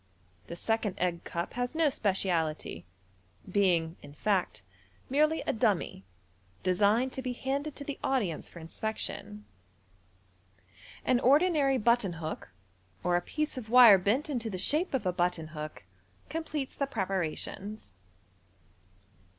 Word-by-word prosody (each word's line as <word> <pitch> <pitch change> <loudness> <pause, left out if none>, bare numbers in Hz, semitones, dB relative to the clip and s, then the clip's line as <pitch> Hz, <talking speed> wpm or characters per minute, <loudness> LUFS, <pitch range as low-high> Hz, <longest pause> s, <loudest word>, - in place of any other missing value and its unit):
The 170 - -6
second 220 +1 -1
egg 175 -1 -1
cup 170 0 -4
has 245 +4 -2
no 320 -3 +3
speciality, 165 - -1 0.6
being, 180 -4 +2
in 145 0 -12
fact, 190 - 0 0.5
merely 305 +3 +3
a - - -1
dummy, 200 - 0 0.6
designed 210 +8 +3
to 265 - -4
be 255 -1 -3
handed 275 +4 -3
to 285 - -6
the 285 -1 -5
audience 210 - 0
for - - -14
inspection. 210 +4 -4 1.6
An 250 -1 +3
ordinary 280 0 +4
button 235 -4 +2
hook, 160 - -6 0.5
or 175 0 +2
a 175 - +2
piece 300 - -2
of 220 -3 -10
wire 235 -5 +9
bent 215 +10 +1
into 240 -6 -2
the 190 - -4
shape 305 - 0
of 250 - -2
a 180 - +1
button 175 -3 0
hook, 155 - -7 0.5
com 325 0 -3
pletes 290 -5 -4
the 280 - -1
preparations. 195 - -3
210 Hz, 135 wpm, -30 LUFS, 175-265 Hz, 1.6 s, wire